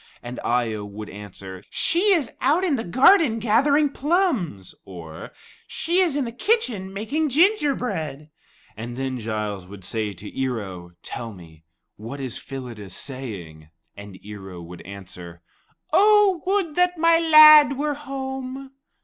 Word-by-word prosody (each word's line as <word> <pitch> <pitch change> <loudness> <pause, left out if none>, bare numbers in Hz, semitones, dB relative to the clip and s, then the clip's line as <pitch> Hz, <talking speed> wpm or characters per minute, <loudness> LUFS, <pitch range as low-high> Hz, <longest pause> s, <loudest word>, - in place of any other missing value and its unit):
And 120 +1 -7
Eye 120 -2 0
o 105 -1 -5
would 105 +1 -8
answer, 95 -2 -9
"She 375 +5 +1
is 320 -10 +1
out 300 +8 +2
in 340 -7 +2
the 225 - -3
garden 260 - +4
gathering 275 +7 +2
plums"; 275 - -1
or, 85 -4 -10 0.4
"she 345 +3 -1
is 350 -7 +2
in 285 -3 0
the 230 - -5
kitchen 245 - -1
making 275 +11 -2
gingerbread." 250 - 0 0.4
And 120 +3 -7
then 130 -1 -3
Giles 105 -4 -4
would 100 0 -12
say 110 -2 -2
to 100 +4 -10
Ear 130 -3 -1
o, 90 -4 -9
"Tell 115 -2 -6
me, 80 -3 -16 0.3
what 115 +7 -8
is 130 -4 -4
Phyllida 120 -7 -8
saying?" 95 - -6 0.3
And 100 -2 -11
Ear 105 -2 -9
o 90 -2 -9
would 85 +1 -11
answer, 90 -3 -10 0.5
"'Oh, 410 -4 +5
would 385 -5 0
that 360 +1 +2
my 330 +1 +4
lad 305 -3 +8
were 295 +1 -1
home!'" 265 -1 -6
155 Hz, 150 wpm, -23 LUFS, -, 0.5 s, lad